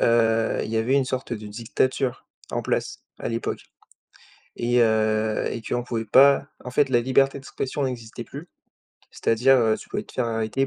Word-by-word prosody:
heu, 115 -1 +2
il - - -6
y 115 - -1
avait 115 +4 +1
une 140 - +3
sorte 130 -1 -4
de 110 -2 -5
dictature 120 +4 -1 0.2
en - - -2
place - - -2 0.2
à - - -4
l'époque 115 0 -3 1.0
et 120 +1 +2
heu, 110 -1 +2
et 115 - -5
qu'on 120 +2 -2
pouvait 115 -2 -3
pas 140 +5 +5 0.2
en 125 - -7
fait, 140 +2 +2
la 120 -2 +4
liberté 135 +3 +2
d'expression 140 +1 -4
n'existait 120 -3 -5
plus. 150 +5 -10 0.6
C'est-à-dire, 130 +4 +3
heu, 110 -2 +3
tu - - -12
pouvais - - -3
te - - -16
faire 125 - -1
arrêter 115 +3 -1
120 Hz, 180 wpm, -24 LUFS, 110-130 Hz, 1.0 s, pas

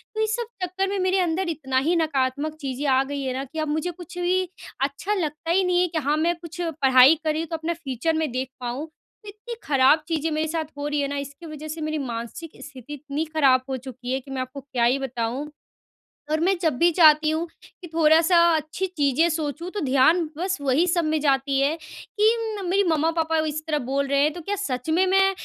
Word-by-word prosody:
तो 435 - -3
ये 435 - +2
सब 470 +2 -1 0.2
चक्कर 375 +2 -1
में 400 - -2
मेरे 375 +1 +2
अंदर 350 +1 0
इतना 270 -5 -2
ही 345 - +3
नकारात्मक 295 -1 0
चीज़ें 275 +1 -3
आ 265 0 +4
गई 285 -1 -3
है 260 -1 -2
ना, 265 - -3
कि 295 +4 -7
अब 310 - -1
मुझे 315 +4 -1
कुछ 350 0 -11
भी 365 0 +1 0.3
अच्छा 280 +9 -1
लगता 325 -3 -2
ही 380 +2 +3
नहीं 360 0 +2
है, 360 - +2
कि 330 - -4
हाँ, 290 +1 0
मैं 340 +2 +1
कुछ 335 +1 -9
पढ़ाई 275 -4 +5
कर 310 - +1
रही 310 +1 -1
हूँ 330 - -5
तो 330 - -2
अपना 320 +2 -2
फ्यूचर 320 -1 -2
में 300 - -2
देख 260 +1 -3
पाऊँ। 250 +6 -4
तो 410 +6 -24
इतनी 430 +3 -8
ख़राब 285 +2 +4
चीज़ें 320 -1 -1
मेरे 310 +1 0
साथ 320 0 -2
हो 290 0 -3
रही 295 -1 0
है 280 - 0
ना 285 0 -4
इसकी 280 +4 -7
वज़ह 310 -1 -8
से 310 +1 -6
मेरी 310 0 -2
मानसिक 245 +4 -5
स्थिति 280 -1 -10
इतनी 290 +2 -4
ख़राब 280 -5 +3
हो 260 - -2
चुकी 255 -1 -8
है, 265 - 0
कि 270 +1 -13
मैं 260 -1 -2
आपको 255 +2 -7
क्या 255 -3 -2
ही 255 +3 +3
बताऊँ। 255 +2 -3 0.8
और 310 - +1
मैं 370 +4 +3
जब 320 -7 0
भी 345 +1 +5
चाहती 310 -2 +6
हूँ, 320 +2 -1 0.4
कि 345 - -8
थोड़ा-सा 325 +2 +5 0.2
अच्छी 315 +5 -3
चीज़ें 290 +2 +3
सोचूँ 315 +2 -3
तो 415 - -4
ध्यान 275 +6 +4
बस 375 +1 -1
वही 285 +5 +2
सब 345 -1 +1
में 310 0 +1
जाती 275 -1 +1
है, 285 +4 +1
कि 435 +5 -1
मेरी 395 +3 +3
मम्मा-पापा 320 +1 +1
इस 310 0 -3
तरह 305 -2 0
बोल 280 +1 +1
रहे 280 0 +1
हैं, 300 +2 +3
तो 350 - -8
क्या 405 +5 -3
सच 265 -9 -4
में 345 +4 +3
मैं 385 +1 +4
310 Hz, 230 wpm, -24 LUFS, 275-345 Hz, 0.8 s, चाहती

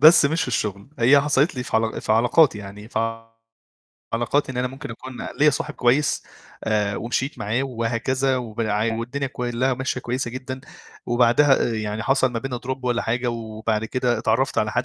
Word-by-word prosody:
بس 160 0 +9
مش 160 +4 +2
في - - -2
الشغل، 105 -3 -2
هي 130 +5 +6
حصلِت 145 +2 +2
لي 125 - -3
في 125 - -1
عل 110 0 0
في - - 0
علاقاتي 120 +3 +4
يعني 105 +1 -10
في 115 0 -2 0.9
علاقاتي 130 +4 0
إن - - -8
أنا 125 +1 0
ممكن 135 -1 -8
أكون 125 +2 -8
ليّا 150 +1 +6
صاحب - - -3
كويس، 130 +5 +2 0.4
آآ، 105 -2 +1
ومشيت 125 +4 -2
معاه 110 +4 -1
وهكذا 130 +2 0
وبع 110 -2 -1
والدنيا 125 +5 -3
كُلّها 125 0 -1
ماشية 130 0 -2
كويسة 125 0 -2
جدًا، 130 +1 -6 0.5
وبعدها 120 +2 +4
يعني 110 0 -3
حصل 135 0 +2
ما 115 - -1
بيننا 125 +1 -4
drop 130 +1 -2
والّا 120 -1 +1
حاجة، 120 +2 -1
وبعد 110 -1 -2
كده 120 0 0
اتعرّفت 115 +4 +1
على 110 0 0
حد 120 - 0
120 Hz, 180 wpm, -23 LUFS, 110-130 Hz, 0.9 s, بس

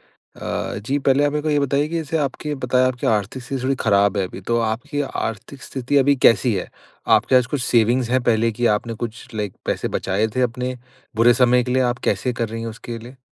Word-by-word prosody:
अ, - - -5
जी 140 +3 0
पहले 135 +1 +3
आप 145 - +1
मेरे 150 - -1
को 155 - -2
ये 145 -1 +2
बताइए 140 +1 +1
कि 170 - -4
जैसे 160 0 -1
आपके 150 +1 -2
बताया 130 -1 +2
आपकी 125 -1 -2
आर्थिक 110 +4 -1
स्थिति 130 0 -4
थोड़ी 135 +1 +1
खराब 100 -1 +3
है 95 - +1
अभी 95 - -10
तो 115 0 +2
आपकी 125 +7 -2
आर्थिक 120 0 -5
स्थिति 130 +2 -1
अभी 140 +1 +4
कैसी 120 -2 +4
है? 95 - -4 0.4
आपके 130 - +4
पास 125 -1 +5
कुछ 145 - -1
सेविंग्स 120 +1 +2
है 130 - +3
पहले 115 0 +2
की 120 +2 -2
आपने 115 +2 -7
कुछ 115 +3 -6
लाइक 105 -3 -3
पैसे - - -1
बचाए 100 +3 0
थे 130 - +1
अपने 125 +1 -2 0.4
बुरे 115 +2 +5
समय 125 0 +4
के 125 - -4
लिए 130 - +3
आप 120 - -6
कैसे 125 - -1
कर 115 -1 -2
रही 115 +1 -5
हैं 115 - -4
उसके 115 +1 -7
लिए? 120 +3 -12
125 Hz, 230 wpm, -21 LUFS, 115-135 Hz, 0.4 s, पास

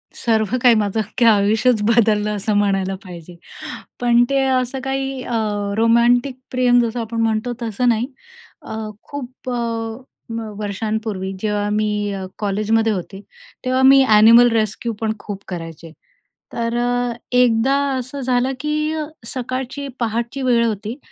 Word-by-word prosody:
सर्व 220 0 0
काही 245 -2 +6
माझं 210 0 0
अख्खं 220 +3 0
आयुष्यच 215 +2 +3
बदललं, 210 -2 +2
असं 210 +2 -1
म्हणायला 195 -1 +1
पाहिजे. 175 -1 -11 0.7
पण 240 0 +4
ते 275 0 +2
असं 260 0 0
काही 270 -1 -2
अ, 235 - -2 0.4
रोमॅन्टिक 235 +3 +3 0.2
प्रेम, 250 -1 +3
जसं 235 +1 -2
आपण 230 0 -3
म्हणतो, 225 +2 0
तसं 235 +2 0
नाही. 230 +1 +1 0.6
अ, - - -6 0.3
खूप 260 -2 -8
अ, - - -2 0.8
व 225 -2 -5
वर्षांपूर्वी, 210 -1 -3
जेव्हा 210 -1 -1
मी 210 -1 0
अ, 190 -1 -5
कॉलेजमध्ये 215 +2 +1
होते, 195 +1 -6 0.4
तेव्हा 255 +1 +1
मी 270 0 +7
ॲनिमल 225 +3 +7
रेस्क्यूपण 220 0 -1
खूप 200 -1 -7
करायचे. 165 -2 -7 0.6
तर 230 0 -2
अ, 245 0 0 0.2
1दा 250 +2 +3 0.2
असं 260 +3 -6
झालं 250 0 +1
की 305 +1 -1 0.3
सकाळची, 260 +3 -4
पहाटची 235 +3 -2
वेळ 240 -3 +3
होती 220 +2 -3
230 Hz, 135 wpm, -20 LUFS, 210-250 Hz, 0.8 s, मी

